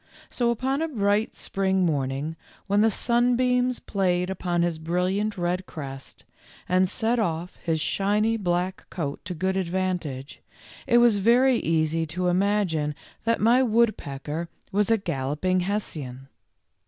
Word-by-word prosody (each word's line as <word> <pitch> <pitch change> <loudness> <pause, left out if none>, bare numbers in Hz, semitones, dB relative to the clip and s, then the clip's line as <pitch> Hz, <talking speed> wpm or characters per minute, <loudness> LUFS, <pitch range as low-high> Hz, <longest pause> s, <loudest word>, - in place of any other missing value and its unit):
So 240 -2 +1
upon 265 +5 0
a 325 - 0
bright 210 -5 0
spring 190 -1 0
morning, 145 0 -1 0.3
when 205 +1 +2
the 225 - +5
sunbeams 245 +2 +2
played 180 -2 0
upon 175 -2 -1
his 170 -2 -1
brilliant 185 +6 -1
red 180 +1 -1
crest, 135 -4 -8 0.4
and 185 +1 +3
set 235 +3 0
off 170 -3 -2
his 165 -2 -1
shiny 210 +6 +1
black 180 -2 -2
coat 145 -5 -4
to 180 0 -4
good 190 +3 -1
advantage, 175 -7 -3 0.5
it 240 -2 +5
was 240 -3 +5
very 240 +5 +4
easy 160 -1 0
to 180 +3 -1
imagine 180 -6 +1 0.3
that 230 0 +2
my 235 +4 +5
woodpecker 170 - 0 0.2
was 205 +2 +1
a 225 - +4
galloping 155 +2 -1
Hessian. 150 -9 -4
185 Hz, 135 wpm, -25 LUFS, 165-220 Hz, 0.5 s, the